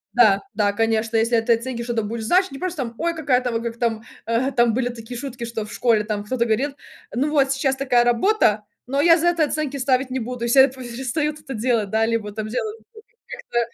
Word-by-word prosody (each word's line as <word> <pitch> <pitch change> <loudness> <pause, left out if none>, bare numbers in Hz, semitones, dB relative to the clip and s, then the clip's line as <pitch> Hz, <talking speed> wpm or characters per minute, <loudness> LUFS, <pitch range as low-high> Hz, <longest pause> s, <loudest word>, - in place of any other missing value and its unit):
Да, 210 -5 +5
да, 205 -1 +1
конечно, 225 +1 0
если 230 +2 +2
этой 230 +1 +3
от 230 - -7
оценки 250 -1 -4
что-то 235 -2 -1
будет 225 +2 -4
значить. 370 - +3
Не 275 - -8
просто 365 -1 -3
там- 235 -1 -7
ой 335 +1 0
какая-то 255 -6 +1
там 230 0 -2
как 235 0 -4
там, 225 -2 -1 0.2
э, 235 +4 +1
там 240 -3 +3
были 245 -1 0
такие 240 0 -8
шутки, 265 -3 -6
что 230 -2 -4
в 210 - -10
школе 225 -3 +2
там 210 -1 -3
кто-то 235 +2 -1
говорит: 260 +6 0 0.4
"Ну 280 +5 0
вот 275 -3 +3
сейчас 275 -1 0
такая 255 -3 +2
работа, 240 - +2 0.2
но 275 +3 0
я 330 +2 +6
за 340 +1 +1
это 340 -2 +3
оценки 295 -2 -2
ставить 255 0 +1
не 260 - -1
буду" 245 0 -5
если 240 +3 +4
я 270 - +7
перестают 265 +4 -3
это 270 -3 -7
делать, 225 -2 0
да, 220 +2 +2
либо 225 -2 -1
там 215 +1 -5
делать 420 - -3 0.5
как-то - - -4
240 Hz, 225 wpm, -22 LUFS, 225-275 Hz, 0.5 s, я